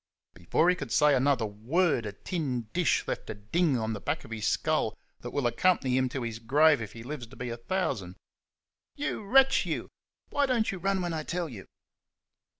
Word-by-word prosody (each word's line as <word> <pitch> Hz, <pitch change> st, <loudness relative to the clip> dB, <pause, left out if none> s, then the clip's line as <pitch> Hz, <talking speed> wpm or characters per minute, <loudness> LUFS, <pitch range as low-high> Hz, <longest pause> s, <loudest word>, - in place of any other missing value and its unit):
Before 90 Hz, -, +1 dB
he 180 Hz, -, +5 dB
could -, -, -7 dB
say 150 Hz, -1 st, +5 dB
another 130 Hz, -3 st, +2 dB
word 120 Hz, -, 0 dB
a -, -, -4 dB
tin 135 Hz, -, -3 dB
dish 180 Hz, -1 st, +1 dB
left -, -, -4 dB
a -, -, -4 dB
dinge 135 Hz, -, +1 dB
on 110 Hz, -1 st, -2 dB
the 105 Hz, -, -6 dB
back 145 Hz, +7 st, -2 dB
of 115 Hz, -, -13 dB
his 110 Hz, -2 st, -2 dB
skull -, -, 0 dB, 0.2 s
that -, -, -6 dB
will 140 Hz, -3 st, -2 dB
accompany 130 Hz, 0 st, +2 dB
him 130 Hz, 0 st, +2 dB
to 125 Hz, 0 st, -4 dB
his 115 Hz, -1 st, -4 dB
grave 145 Hz, +4 st, +4 dB
if 110 Hz, -, -6 dB
he 115 Hz, -, -9 dB
lives 130 Hz, -2 st, -6 dB
to 130 Hz, -, -14 dB
be 125 Hz, -, -5 dB
a 115 Hz, -, -5 dB
thousand. 115 Hz, -, -2 dB, 0.8 s
"You 290 Hz, -, -3 dB
wretch, 270 Hz, +6 st, +5 dB
you! -, -, -3 dB, 0.4 s
Why 285 Hz, -1 st, +2 dB
don't 235 Hz, -4 st, +1 dB
you 190 Hz, -, -6 dB
run 195 Hz, +1 st, 0 dB
when 175 Hz, -1 st, -2 dB
I 160 Hz, -, -2 dB
tell 170 Hz, +2 st, -3 dB
you?" 110 Hz, -10 st, -10 dB
140 Hz, 205 wpm, -29 LUFS, 115-175 Hz, 0.8 s, he